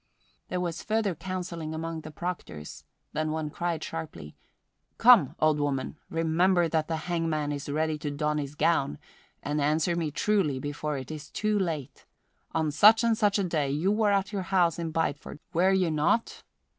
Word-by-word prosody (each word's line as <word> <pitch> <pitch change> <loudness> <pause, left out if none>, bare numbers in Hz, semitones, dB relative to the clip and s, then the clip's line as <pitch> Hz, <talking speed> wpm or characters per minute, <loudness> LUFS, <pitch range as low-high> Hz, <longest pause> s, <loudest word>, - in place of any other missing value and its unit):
There 180 - -2
was 175 -2 -3
further 215 -3 0
counselling 170 -2 -5
among 165 0 -4
the 155 - -9
proctors, 155 - -6 0.3
then 155 0 -1
one 155 -1 -3
cried 170 -1 -2
sharply, 115 - -7 0.6
"Come, 200 - +6
old 155 -1 +3
woman, 140 -1 -1
remember 170 +2 +2
that 160 -1 0
the 165 - -1
hangman 165 -4 -1
is 145 0 -5
ready 155 +1 0
to 150 - -3
don 150 +1 -1
his 145 0 -5
gown, 140 - +1 0.5
and 150 +1 -1
answer 155 +4 +1
me 165 -3 -1
truly 155 -2 +1
before 145 +2 -3
it 130 +2 -7
is 150 -1 -8
too 210 -1 0
late: 160 -8 -4 0.4
on 160 -2 0
such 215 +9 +6
and 230 -1 +3
such 210 -2 +2
a 200 - +1
day 155 -6 0
you 155 +8 +1
were 210 -1 +2
at 200 +1 0
your 200 - -1
house 175 -4 +2
in 165 -1 -2
Bideford, 160 -3 -2 0.2
were 180 +3 +4
you 185 -3 +2
not?" 155 +9 +1
160 Hz, 175 wpm, -28 LUFS, 150-180 Hz, 0.6 s, Come